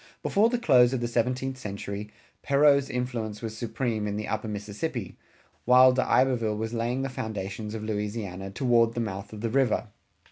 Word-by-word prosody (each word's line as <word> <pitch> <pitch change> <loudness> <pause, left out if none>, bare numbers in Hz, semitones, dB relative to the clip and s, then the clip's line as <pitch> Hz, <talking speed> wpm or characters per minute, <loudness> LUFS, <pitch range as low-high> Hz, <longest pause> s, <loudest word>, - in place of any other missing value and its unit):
Before 215 +3 +3
the 245 - 0
close 130 - +5
of 130 - 0
the 120 - -1
seventeenth 125 +3 -1
century, 100 -1 -5 0.3
Perrot's 140 -1 +4
influence 120 -4 -3
was 110 -1 -4
supreme 110 -1 -2
in 100 - -2
the 105 +1 -4
Upper 110 0 -2
Mississippi, 105 - -4 0.5
while 125 +1 +7
D'Iberville 125 -3 +2
was 110 +1 -3
laying 120 +3 -1
the - - -1
foundations 105 -3 -5
of 110 - -5
Louisiana 105 -3 -4
toward 115 +1 +2
the - - -1
mouth 100 -2 -4
of 105 -1 -8
the 115 - -1
river. 120 -4 +1
115 Hz, 170 wpm, -27 LUFS, 105-130 Hz, 0.5 s, while